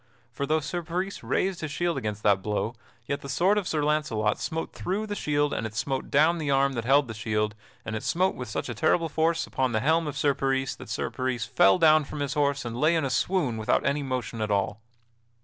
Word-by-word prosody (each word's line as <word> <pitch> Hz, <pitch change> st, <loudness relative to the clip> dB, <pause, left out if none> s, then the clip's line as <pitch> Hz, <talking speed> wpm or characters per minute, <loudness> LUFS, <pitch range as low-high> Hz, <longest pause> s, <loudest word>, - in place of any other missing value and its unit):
For 140 Hz, +3 st, -3 dB
though 155 Hz, +1 st, +2 dB
Sir 175 Hz, +4 st, -3 dB
Peris 180 Hz, +4 st, -3 dB
raised 190 Hz, -1 st, -1 dB
his 155 Hz, -, -3 dB
shield 170 Hz, +2 st, 0 dB
against 105 Hz, 0 st, -4 dB
that 100 Hz, -2 st, +4 dB
blow, 105 Hz, +3 st, -2 dB, 0.3 s
yet 140 Hz, +3 st, -3 dB
the 140 Hz, -, -8 dB
sword 185 Hz, +10 st, +3 dB
of 190 Hz, -, -5 dB
Sir 150 Hz, -2 st, 0 dB
Launcelot 145 Hz, -9 st, 0 dB
smote 160 Hz, 0 st, -3 dB
through 200 Hz, +4 st, -2 dB
the 205 Hz, -, -4 dB
shield 145 Hz, -6 st, 0 dB
and 110 Hz, -, -2 dB
it 110 Hz, -, -12 dB
smote 135 Hz, +3 st, -2 dB
down 160 Hz, +4 st, +4 dB
the 150 Hz, -3 st, -2 dB
arm 135 Hz, 0 st, +3 dB
that 115 Hz, -2 st, -3 dB
held 140 Hz, +2 st, +4 dB
the 110 Hz, -, -5 dB
shield, 105 Hz, -1 st, -1 dB, 0.3 s
and 110 Hz, -, -3 dB
it 110 Hz, -, -3 dB
smote 185 Hz, +3 st, +1 dB
with 125 Hz, -2 st, -7 dB
such -, -, -3 dB
a 120 Hz, -, -3 dB
terrible 160 Hz, +6 st, +2 dB
force 165 Hz, +2 st, +1 dB
upon 130 Hz, -2 st, -1 dB
the 110 Hz, -, +2 dB
helm 160 Hz, +6 st, +2 dB
of 145 Hz, -1 st, -4 dB
Sir 145 Hz, -1 st, +3 dB
Peris 135 Hz, 0 st, 0 dB
that -, -, -11 dB
Sir -, -, -2 dB
Peris 130 Hz, -3 st, -2 dB
fell 175 Hz, +12 st, +4 dB
down 155 Hz, -2 st, +5 dB
from 145 Hz, +1 st, -6 dB
his 140 Hz, -1 st, -1 dB
horse 140 Hz, -2 st, 0 dB
and 115 Hz, -1 st, -4 dB
lay 155 Hz, +3 st, +4 dB
in 160 Hz, -3 st, +1 dB
a 135 Hz, -, -2 dB
swoon 145 Hz, -3 st, 0 dB
without 110 Hz, -, +1 dB
any 140 Hz, +2 st, +1 dB
motion 125 Hz, -4 st, -3 dB
at 110 Hz, -, -1 dB
all. 100 Hz, +1 st, 0 dB
140 Hz, 240 wpm, -27 LUFS, 120-160 Hz, 0.3 s, down